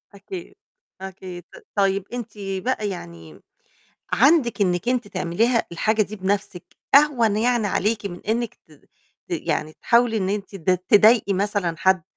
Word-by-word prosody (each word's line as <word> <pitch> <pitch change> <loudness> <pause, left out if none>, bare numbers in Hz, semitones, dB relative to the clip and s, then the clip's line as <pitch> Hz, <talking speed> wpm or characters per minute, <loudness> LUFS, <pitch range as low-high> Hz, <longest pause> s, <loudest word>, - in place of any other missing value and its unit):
أكيد، 360 - -9 0.5
أكيد. 185 -2 -8
ت - - -14
طيب 195 -1 +2
أنتِ 240 -3 -5
بقى 200 +3 -2
يعني 85 - -9 0.7
عندِك 270 -5 +3
إنِّك 180 +3 +1
أنتِ 245 -4 0
تعمليها 225 +8 0
الحاجة 215 +5 +1
دي 215 +1 -6
بنفسِك، 190 -1 -2 0.3
أهوَن 255 -8 +5
يعني 235 -1 +1
عليكِ 210 +1 0
من 175 -2 -7
إنِّك 235 0 -1
ت 160 - -25 0.6
ت - - -24
يعني 155 +1 -2
تحاولي 235 +4 +2
إن 190 -2 -1
أنتِ 200 -1 -4
ت 185 +1 -1 0.2
تضايقي 215 0 +5
مثلًا 195 -3 -1
حد 190 -2 +3
205 Hz, 145 wpm, -23 LUFS, 185-230 Hz, 0.7 s, أهوَن